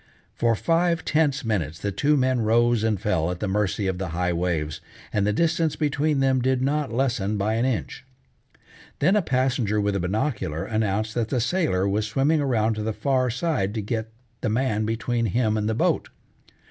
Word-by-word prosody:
For 115 -1 +1
five 170 +5 +1
tense 150 -4 +1
minutes 85 -9 -1
the 100 - -3
two 145 +10 +2
men 130 -2 +2
rose 115 +1 +3
and 110 -3 +1
fell 85 -5 0
at 90 0 -4
the 105 - -2
mercy 100 0 0
of 95 -1 -1
the 95 - -2
high 90 +2 -1
waves, 85 -3 -2 0.3
and 100 -1 +1
the - - +3
distance 165 +5 +1
between 150 -1 0
them 130 -1 +2
did 130 +1 +1
not 140 0 0
lessen 115 -5 0
by 105 +2 0
an 115 +2 +1
inch. 125 0 -3 0.9
Then 185 +8 +3
a 210 - +4
passenger 130 - 0
with 100 -1 0
a - - 0
binocular 95 - -2
announced 110 0 -1
that 115 -3 -1
the 130 - 0
sailor 120 - +1
was 105 +2 0
swimming 140 +7 +2
around 115 -5 +1
to - - -2
the 110 +1 -2
far 130 +1 +1
side 120 - -1
to 110 - -1
get 110 +1 -3 0.3
the 115 - 0
man 110 -2 0
between 115 +1 -1
him 110 +1 +1
and 105 0 0
the 110 - 0
boat. - - +1
115 Hz, 195 wpm, -24 LUFS, 105-135 Hz, 0.9 s, a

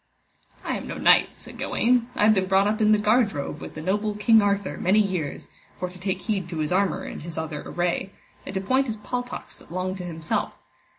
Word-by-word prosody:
I - - -1
am - - -7
no - - -5
knight, - - +5
said - - -12
Gawaine, 245 0 +2
I - - +1
have 215 +1 +7
been 190 -2 +1
brought 195 +1 +4
up 215 +2 0
in 215 0 +5
the 215 - +6
guardrobe 210 - +1
with - - -8
the 155 - -6
noble 205 +3 0
King 220 +1 +5
Arthur 200 -1 0
many 190 +4 +3
years, 185 -9 -1 0.3
for 180 - -3
to 180 - -13
take 190 0 -2
heed 190 -3 -2
to 170 - -5
his 155 0 -1
armour 190 -1 +1
and - - -7
his 165 +1 -7
other 160 -2 -3
array, 175 +2 -1 0.3
and 195 - -7
to 190 - 0
point 260 +7 +2
his 220 -2 -3
paltocks 245 +3 -5
that - - -18
long 185 +1 -2
to 180 - -6
himself. 165 -3 -2
195 Hz, 225 wpm, -25 LUFS, 175-215 Hz, 0.3 s, have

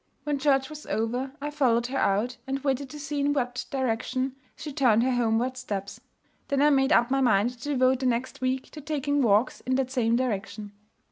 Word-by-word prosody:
When 295 -2 -1
church 270 -2 +2
was 305 -1 -10
over, 245 +4 -2
I 295 +1 -4
followed 245 -5 +2
her 265 +2 -3
out, 220 +6 +1
and 270 0 -1
waited 270 -1 -1
to 300 - -9
see 295 0 -3
in 285 +1 +2
what 250 -3 -2
direction 260 +1 -1 0.2
she 300 -2 -7
turned 240 -5 +3
her 260 - +1
homeward 245 +1 +1
steps. 200 -5 -5 0.5
Then 280 - 0
I 295 +1 +5
made 270 -1 +3
up 240 +2 +4
my 270 0 +2
mind 240 -2 +3
to 250 +4 -8
devote 260 -2 +3
the 260 - 0
next 250 +2 -2
week 260 0 -2
to 300 - -9
taking 290 -1 -1
walks 220 0 +2
in 260 - -1
that 260 -1 -1
same 235 -3 +2
direction. 215 -4 -3
260 Hz, 205 wpm, -27 LUFS, 235-275 Hz, 0.5 s, I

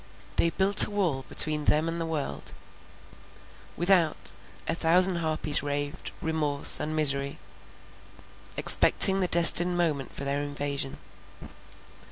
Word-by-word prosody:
"They 170 - 0
built 190 +3 +4
a - - -12
wall 175 -11 -5
between 155 -1 +4
them 155 +2 -1
and 165 0 -7
the 165 - -6 1.7
world"—Without, 175 -3 -2 0.4
a - - -2
thousand 175 +2 +1
harpies 155 -3 -4
raved, 145 +2 -7
remorse 150 -3 0
and 155 +1 -7
misery, 140 -2 -3 1.2
expecting 195 0 +6
the 185 - -2
destined 175 +1 +3
moment 155 -6 -4
for - - -10
their 140 +1 -4
invasion. 145 -1 -6
155 Hz, 115 wpm, -24 LUFS, 145-175 Hz, 1.7 s, expecting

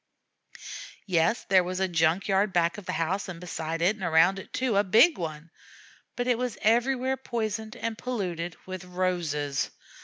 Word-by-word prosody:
Yes, 175 +4 +1
there 185 -2 +5
was 185 +1 -3
a 190 - +2
junk 170 +1 +1
yard 195 +1 +2
back 170 +1 +1
of 195 - -14
the - - -2
house 185 +4 -1
and 170 -3 -7
beside 165 -1 -4
it 195 +5 +3
and 200 - -9
around 170 +3 +4
it - - -11
too, 255 -4 0
a 200 - +4
big 220 - +5
one, 160 -1 -6 0.6
but 245 - -2
it 245 -2 +1
was 250 -2 -2
everywhere 255 +4 +2
poisoned 220 -3 -3
and 230 -2 -3
polluted 175 -9 -3
with 185 -1 -6
roses. 175 -6 -1
185 Hz, 175 wpm, -27 LUFS, 170-220 Hz, 0.6 s, there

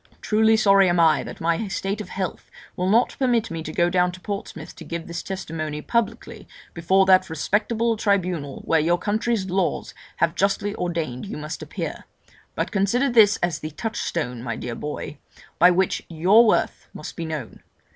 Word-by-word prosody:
Truly 220 +1 +3
sorry 195 -3 +5
am 175 0 +2
I 160 -2 +4
that - - -8
my 170 +6 0
state 195 +2 -3
of - - -9
health 190 -2 -5 0.3
will 180 +1 -1
not 230 +4 +3
permit 240 -6 +1
me 165 -1 -4
to 155 - -6
go 175 +2 +2
down 180 0 +2
to 185 - -10
Portsmouth 200 +1 -6
to - - -9
give 170 -1 -5
this 170 0 -5
testimony 155 -5 -5
publicly 235 -3 -2 0.3
before 190 +3 +3
that 185 -1 +4
respectable 220 +8 0
tribunal 180 -9 -1
where 165 - +3
your 170 +3 +2
country's 210 +1 -1
laws 190 -1 -1 0.2
have 170 0 +1
justly 200 +1 0
ordained 165 - -3
you - - -6
must 150 +2 -6
appear; - - -6 0.5
but - - -2
consider 235 +7 +1
this 220 -3 +6
as 170 -3 0
the 155 - -5
touchstone, 160 - -3
my 115 -2 -4
dear 120 - -5
boy, 150 +3 -6 0.4
by 180 - +8
which 185 +1 +1
your 190 +8 +5
worth - - 0
must - - -8
be 170 - -5
known. 155 -7 -6
185 Hz, 175 wpm, -23 LUFS, 165-205 Hz, 0.5 s, by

